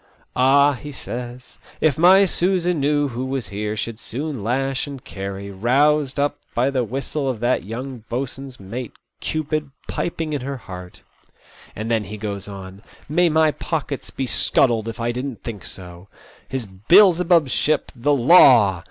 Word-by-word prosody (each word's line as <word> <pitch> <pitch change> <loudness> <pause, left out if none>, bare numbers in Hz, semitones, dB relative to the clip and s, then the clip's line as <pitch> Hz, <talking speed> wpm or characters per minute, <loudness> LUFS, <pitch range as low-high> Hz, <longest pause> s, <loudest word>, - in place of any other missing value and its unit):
"Ah," 140 +3 +5
he 145 +3 -8
says, 125 -1 -8
" - - -24
if 155 -4 +2
my 185 +4 +6
Susan 180 -2 0
knew 145 0 +1
who 125 +1 -4
was 130 -6 -3
here 105 +2 -3
she'd 115 +1 -4
soon 135 -2 -4
lash 135 +4 -1
and 140 -3 -8
carry, 100 0 -6
roused 135 +7 +2
up 145 +1 0 0.2
by 125 +3 +2
the 130 -2 0
whistle 135 +4 -3
of 125 -4 -3
that 120 -4 0
young 125 +4 -6
boat 125 +2 -2
swain's 135 -1 -10
mate, 115 +5 -6 0.3
Cupid, 155 -1 -2 0.2
piping 165 -2 -3
in 145 - -2
her 135 +1 -4
heart; 90 -5 -10 0.4
" - - -24
and 110 +2 -4
then 110 -2 +1
he 105 +3 -7
goes 100 -2 -5
on: 95 -1 -9
" - - -26
May 175 -1 +5
my 160 0 +3
pockets 145 -3 -4
be 135 - -4
scuttled 115 -2 +3
if 115 +1 -6
I 115 +1 0
didn't 125 0 -5
think 110 -5 -6
so 90 0 -9
I - - -32 0.4
His 130 -3 -3
Beelzebub's 170 - +4
ship, 150 +4 0
the 145 +4 +1
Law 120 - +6
130 Hz, 175 wpm, -21 LUFS, 110-145 Hz, 0.4 s, my